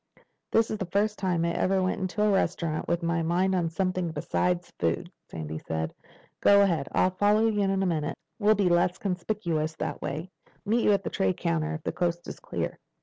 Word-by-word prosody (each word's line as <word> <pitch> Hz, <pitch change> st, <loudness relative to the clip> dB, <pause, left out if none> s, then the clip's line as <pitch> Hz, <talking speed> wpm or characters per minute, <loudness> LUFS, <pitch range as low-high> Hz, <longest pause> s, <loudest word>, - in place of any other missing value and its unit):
"This 225 Hz, 0 st, +2 dB
is 215 Hz, -, -3 dB
the 190 Hz, -, -3 dB
first 210 Hz, +4 st, 0 dB
time 180 Hz, -3 st, +1 dB
I 170 Hz, -, +1 dB
ever 190 Hz, +2 st, +1 dB
went 185 Hz, +1 st, -1 dB
into 190 Hz, +3 st, -1 dB
a 210 Hz, -, +4 dB
restaurant 170 Hz, -4 st, 0 dB
with 170 Hz, 0 st, 0 dB
my 170 Hz, 0 st, +1 dB
mind 180 Hz, +4 st, +1 dB
on 175 Hz, -3 st, +1 dB
something 185 Hz, 0 st, -1 dB
besides 175 Hz, +3 st, -1 dB
food," 85 Hz, -1 st, -1 dB, 0.2 s
Sandy 80 Hz, -1 st, -5 dB
said. 80 Hz, 0 st, -3 dB, 0.5 s
"Go 200 Hz, 0 st, +6 dB
ahead. 165 Hz, -8 st, 0 dB
I'll 185 Hz, -, +3 dB
follow 205 Hz, +4 st, +3 dB
you 215 Hz, -2 st, +2 dB
in 195 Hz, -, +2 dB
a 195 Hz, -, +1 dB
minute. 160 Hz, -4 st, -1 dB, 0.2 s
We'll 215 Hz, 0 st, +4 dB
be 200 Hz, -2 st, +2 dB
less 175 Hz, +1 st, +3 dB
conspicuous 175 Hz, -5 st, -2 dB
that -, -, -4 dB
way. 155 Hz, +6 st, -4 dB, 0.3 s
Meet 230 Hz, +3 st, +2 dB
you -, -, +5 dB
at 200 Hz, -1 st, +1 dB
the -, -, -4 dB
tray 190 Hz, -1 st, +1 dB
counter 165 Hz, -2 st, -1 dB
if 155 Hz, -, -8 dB
the -, -, -1 dB
coast 175 Hz, -1 st, -2 dB
is -, -, -7 dB
clear." -, -, -4 dB
180 Hz, 205 wpm, -27 LUFS, 165-200 Hz, 0.5 s, Go